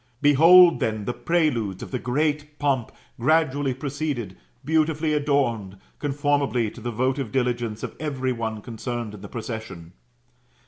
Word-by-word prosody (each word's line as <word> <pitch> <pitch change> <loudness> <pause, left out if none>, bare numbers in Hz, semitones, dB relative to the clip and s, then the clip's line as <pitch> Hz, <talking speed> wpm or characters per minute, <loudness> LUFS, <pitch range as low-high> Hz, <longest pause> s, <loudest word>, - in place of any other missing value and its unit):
Behold, 165 +5 +7
then, 110 -2 -1
the 125 - -2
preludes 120 - 0
of - - -9
the 130 - -2
great 150 +3 -1
pomp 135 -5 0 0.3
gradually 145 0 +2
proceeded, 135 - -4 0.3
beautifully 155 0 +1
adorned, 125 -10 0 0.2
conformably 140 -5 0
to - - -12
the 120 - -3
votive 130 +1 -1
diligence 120 -4 -1
of - - -5
every 135 -4 -2
one 110 -3 -4
concerned 120 -1 -5
in 105 - -10
the 100 - -9
procession. 110 -7 -7
130 Hz, 135 wpm, -24 LUFS, 115-150 Hz, 0.3 s, Behold